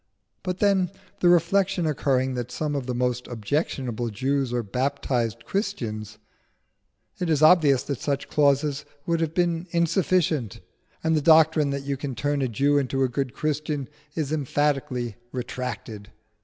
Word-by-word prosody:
But 180 -1 -3
then, 195 -3 +3 0.3
the 175 - +4
reflection 180 +1 +3
occurring 135 -3 +1
that 120 -1 -4
some 150 -1 -2
of 135 -3 -3
the 125 - -2
most 125 0 -1
objectionable 120 0 -2
Jews 130 +4 -1
are 120 -1 -1
baptised 120 0 -1
Christians, 110 - -3 1.0
it 180 - -1
is 155 -1 +2
obvious 155 -5 +6
that 140 -4 -4
such 140 -1 -1
clauses 145 0 +2 0.2
would 170 -1 +1
have 160 -1 -1
been 175 -1 +1
insufficient, 170 - +1 0.4
and 160 0 +2
the 155 - +2
doctrine 160 -1 +5
that 140 0 -3
you 140 -1 -2
can 135 -2 -5
turn 145 +1 0
a 130 - +1
Jew 140 +5 +2
into 135 0 0
a 130 - +2
good 130 0 -3
Christian 150 -2 -2 0.3
is 155 -3 -2
emphatically 135 -5 -1
retracted. 120 -4 -5
140 Hz, 150 wpm, -25 LUFS, 125-160 Hz, 1.0 s, obvious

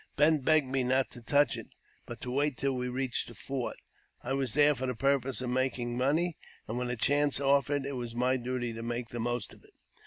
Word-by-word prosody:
Bent 150 -1 +4
begged 155 0 +4
me 130 0 0
not 130 +1 +1
to 120 - -10
touch 145 +1 +3
it, - - -7 0.4
but - - -7
to 125 - -4
wait 140 0 +1
till 135 0 0
we 125 0 -2
reached 130 0 -1
the 120 - -11
fort. 130 +4 -4 0.5
I 130 - -2
was 135 -3 -1
there 150 0 +6
for 130 -1 -3
the 125 - -2
purpose 135 0 +1
of 125 -1 -2
making 125 -2 -1
money, 150 +6 +1 0.3
and 115 +3 -3
when 125 0 -2
a 125 - -1
chance 145 +3 +2
offered, 140 0 +2
it 140 0 -3
was 120 -2 -5
my 125 +2 +2
duty 120 -1 -3
to 115 - -6
make 120 0 -3
the 120 - -5
most 120 +1 -2
of - - -18
it. - - -22
130 Hz, 230 wpm, -30 LUFS, 120-140 Hz, 0.5 s, there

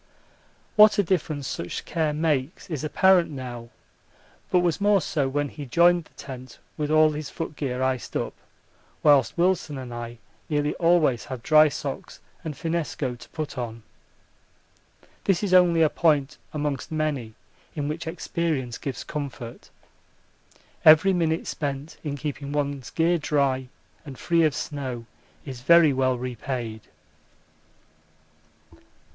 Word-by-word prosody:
What 210 0 +8
a 205 - +4
difference 155 -6 -1
such 85 - -5
care 160 -3 0
makes 150 +1 -1
is 155 -3 -3
apparent 180 +3 +4
now, 125 -4 -7 0.8
but 180 - +3
was 175 0 0
more 205 0 +4
so 145 -4 -1
when 145 +1 -1
he 145 -1 -8
joined 170 +5 +4
the - - -24
tent 130 -2 -9 0.2
with 150 -1 -2
all 155 0 +5
his 150 0 -5
footgear 140 -5 -3
iced 130 -2 -1
up, - - -3 0.7
whilst 145 -3 +4
Wilson 170 -4 +1
and 125 -2 -7
I 120 0 -6 0.3
nearly 145 -1 0
always 165 -8 +3
have 130 -3 -7
dry 155 +1 +6
socks - - -6 0.2
and 155 -3 -5
finnesko 160 -6 -2
to - - -13
put 155 -4 -5
on. 115 -2 -5 1.4
This 195 -1 +2
is 195 -3 0
only 175 -3 +6
a - - +6
point 150 -3 +1
amongst 145 -3 -3
many 145 -8 -2 0.4
in 145 -2 -2
which 160 +2 -4
experience 160 -7 -2
gives 135 -4 -5
comfort. 135 -5 -7 1.1
Every 160 +5 +7
minute 165 -2 0
spent 145 +1 -4
in 145 -2 -3
keeping 145 -1 -5
one's 140 -3 -2
gear 170 +1 +2
dry 140 -3 0 0.4
and 140 -4 -9
free 170 -1 +2
of 155 - +1
snow 130 -5 -4 0.4
is 130 -4 -7
very 160 +1 +6
well 130 -1 +1
repaid. 120 -2 -4
150 Hz, 135 wpm, -25 LUFS, 130-165 Hz, 1.4 s, What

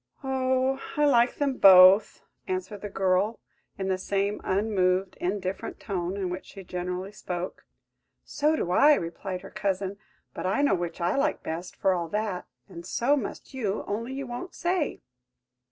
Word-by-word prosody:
"Oh, 260 0 0 0.2
I 295 - +4
like 245 -4 +4
them 280 -3 -1
both!" 190 +2 +7 0.2
answered 370 - -4
the 205 - -5
girl, 195 +3 +1 0.4
in 190 - -3
the 190 -1 0
same 200 +2 -1
unmoved, 190 -2 +1
indifferent 190 +1 -3
tone, 185 -2 -3
in 185 -3 -2
which 180 +1 -5
she 195 - -10
generally 180 +2 -4
spoke. 180 -3 -6 0.6
"So 300 +2 +1
do 175 - -2
I," 290 +10 +6
replied 180 -1 -5
her 195 - -11
cousin; 195 0 -2 0.3
"but - - -3
I 270 +10 +1
know 285 - +4
which 175 -2 -3
I 175 +2 +1
like 285 +2 0
best 165 +3 -5
for 190 - +2
all 170 -2 -2
that; 210 -1 -3 0.2
and 170 - -10
so 240 +10 +1
must 265 -1 -5
you, 215 -6 -2
only 230 +5 -3
you 275 0 -4
won't 265 +9 -7
say. 350 -3 -1
200 Hz, 165 wpm, -27 LUFS, 185-260 Hz, 0.6 s, both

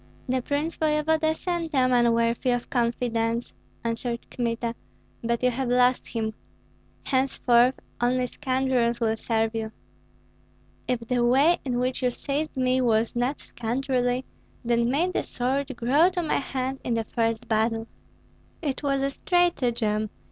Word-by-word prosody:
"The 255 0 +1
prince 295 +5 -2
voevoda 315 +1 +2
sent 335 -3 -3
a 255 -1 +4
man 240 -2 +4
worthy 230 +2 +1
of 245 -1 -1
confidence," 235 -1 0 0.3
answered 235 +1 -3
Kmita, 235 -1 -2 0.5
"but 235 +1 -1
you 250 - +4
have 255 +1 -2
lost 250 +1 +3
him. 220 -2 -2 0.7
Henceforth 260 -1 +3 0.3
only 250 +1 +2
scoundrels 255 -2 0
will 225 -2 +1
serve 225 0 0
you." 220 -1 -3 1.2
"If 250 -2 0
the 240 +1 0
way 275 +8 +4
in 250 -3 -1
which 255 +1 -1
you 250 - +3
seized 285 +4 -3
me 255 0 +2
was 230 -2 +2
not 245 +4 -1
scoundrelly, 250 +1 -1 0.4
then 235 0 +2
may 325 +8 +1
the - - 0
sword 270 +1 -2
grow 285 +9 +4
to 360 -2 -2
my 315 - +1
hand 265 -1 -3
in 240 - 0
the 225 - 0
first 225 0 -1
battle." 225 0 +1 0.7
"It 285 -5 -3
was 275 -2 0
a 275 - 0
stratagem! 240 - +1
250 Hz, 145 wpm, -26 LUFS, 235-270 Hz, 1.2 s, a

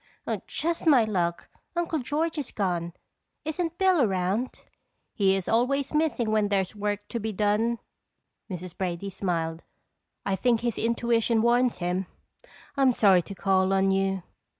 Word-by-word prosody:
"Just 335 +1 -1
my 270 -7 +7
luck 175 -5 -1 0.3
Uncle 340 -2 0
George 305 +5 -1
is 280 - -4
gone. 175 -4 -2 0.5
Isn't 330 +2 -2
Bill 375 -4 +4
around?" 195 +3 0 0.5
"He 195 -3 +3
is 190 -2 -3
always 270 +5 +1
missing 300 -8 +1
when 215 -1 +2
there's 195 -1 0
work 205 0 -2
to 235 - -3
be 220 0 -3
done," 210 +3 +1 0.7
Mrs. 180 -1 -6
Brady 185 +1 -3
smiled. 170 -4 -2 0.6
"I 195 - +1
think 235 +2 +2
his 235 -2 -1
intuition 230 -1 +1
warns 240 +1 +3
him. 180 +1 -2 0.7
I'm 270 -2 +4
sorry 195 -6 +5
to 200 +3 -9
call 190 0 +2
on 195 0 +3
you." 195 -1 0
210 Hz, 145 wpm, -27 LUFS, 190-250 Hz, 0.7 s, my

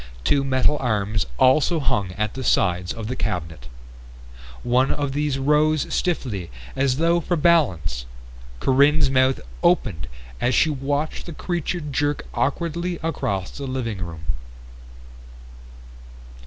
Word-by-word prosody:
Two 140 - +3
metal 135 +2 +2
arms 105 - 0
also 150 +6 +4
hung 100 -9 0
at 105 +1 -2
the 130 - -5
sides 90 -5 +1
of 115 -1 -5
the 125 +4 -3
cabinet. 80 - -4 1.0
One 125 +2 +2
of 145 -2 -1
these 145 -1 0
rose 150 +2 +2
stiffly, 115 - -1 0.3
as 135 -1 +1
though 170 +2 +3
for 175 +2 -1
balance. 95 - +2 0.5
Corinne's 140 - +4
mouth 130 0 +3 0.2
opened 105 - +2 0.3
as 125 0 +2
she 160 - +4
watched 145 +4 -2
the 170 - -6
creature 175 +1 -2
jerk 145 0 -1
awkwardly 170 +5 -1
across 120 - -2
the 140 -1 -6
living 120 -6 -3
room. 80 -3 -7
135 Hz, 125 wpm, -23 LUFS, 105-150 Hz, 1.0 s, also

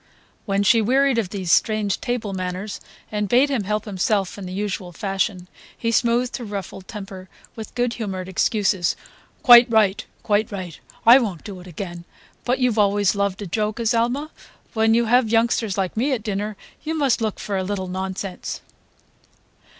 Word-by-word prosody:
When 200 0 +1
she 225 +3 +5
wearied 260 +2 +3
of 205 -6 -2
these 185 -3 -3
strange 215 -1 +2
table 235 -5 -2
manners 185 +2 -4 0.3
and 210 -1 -2
bade 265 +6 +4
him 235 -8 -1
help 210 +2 -1
himself 195 -1 0
in 200 -2 -7
the - - -7
usual 190 -2 -3
fashion, 195 -1 -2 0.3
he 230 - -1
smoothed 240 +1 +1
her 245 - -7
ruffled 195 -3 -6
temper 195 -4 -8 0.3
with 220 +1 -9
good 245 -1 0
humoured 195 -5 -4
excuses, 190 -1 +1 0.5
"Quite 240 0 +9
right. 215 -4 +3 0.2
Quite 210 +1 +1
right. 185 -5 -6 0.3
I 240 +4 +9
won't 200 - -3
do 200 -4 -8
it 180 - -12
again; 175 0 -7 0.4
but 250 +1 +1
you 250 -2 +2
always 205 -1 +3
loved 200 0 -1
a - - -5
joke, 210 +4 -2
Azalma. 240 +6 0 0.4
When 225 0 +3
you 235 0 +3
have 240 0 +3
youngsters 225 -3 +1
like 190 -2 -1
me 265 +6 +1
at 230 -5 -3
dinner 210 0 -3 0.3
you 320 +1 -2
must 275 -7 +1
look 215 -2 -1
for 205 - -3
a 190 - 0
little 190 -1 -3
nonsense." 190 0 -5
210 Hz, 175 wpm, -22 LUFS, 190-230 Hz, 0.5 s, Quite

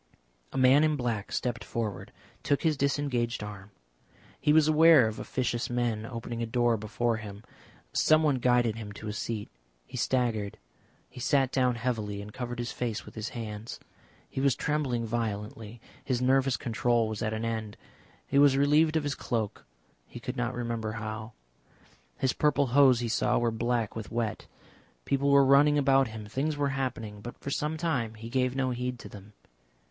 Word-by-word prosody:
A - - -5
man 130 +3 +6
in 155 -1 +2
black 120 -6 -3
stepped 120 -2 -2
forward, 105 -5 -4 0.3
took 140 - 0
his 160 -2 +3
disengaged 135 -5 -1
arm. 100 -1 -8 0.7
He 150 - +2
was 155 0 +5
aware 155 -5 +7
of 110 - -5
officious 120 -2 -2
men 120 -3 -1
opening 115 -1 -5
a 115 - -1
door 120 0 +2
before 115 +2 -1
him. 105 -1 -9 0.5
Someone 155 -3 +4
guided 120 -2 +2
him 105 -2 -7
to 110 +1 -8
a - - -3
seat. 110 -1 -4 0.4
He - - -8
staggered. 115 -6 0 0.5
He - - -12
sat 135 0 +2
down 125 -2 +2
heavily 110 -4 -2
and 105 +1 -9
covered 120 -1 -5
his 120 0 -3
face 115 -4 -3
with - - -12
his 110 +1 -4
hands; 110 -2 -6 0.5
he 135 - -4
was 135 -2 +3
trembling 135 -6 -1
violently, 110 0 -4 0.2
his 125 -3 -1
nervous 130 0 +2
control 120 -1 +1
was 110 -1 -5
at 110 - -1
an 110 +1 -3
end. 110 -2 -3 0.5
He 140 - +2
was 140 -2 +6
relieved 150 +3 +4
of 160 - +1
his 145 -1 -1
cloak, 110 -7 -3 0.4
he - - -9
could - - -5
not - - -2
remember 115 -3 -3
how; 110 +1 -6 0.8
his 130 - +1
purple 145 -1 +2
hose 130 -3 +6
he 120 - -1
saw 115 - +1
were 120 -1 +1
black 115 0 -1
with 110 -2 -6
wet. 115 -2 -2 0.6
People 140 +1 +1
were 140 -1 +6
running 145 +2 +5
about 135 -1 +4
him, 110 -1 -8
things 145 +8 -2
were 145 -1 +1
happening, 120 -6 -4
but 120 +3 -8
for 140 - -6
some 150 +3 -1
time 130 -9 -1
he 115 +1 -8
gave 130 0 0
no 130 -1 0
heed 125 0 -3
to - - -10
them. 105 +1 -12
120 Hz, 180 wpm, -29 LUFS, 110-135 Hz, 0.8 s, aware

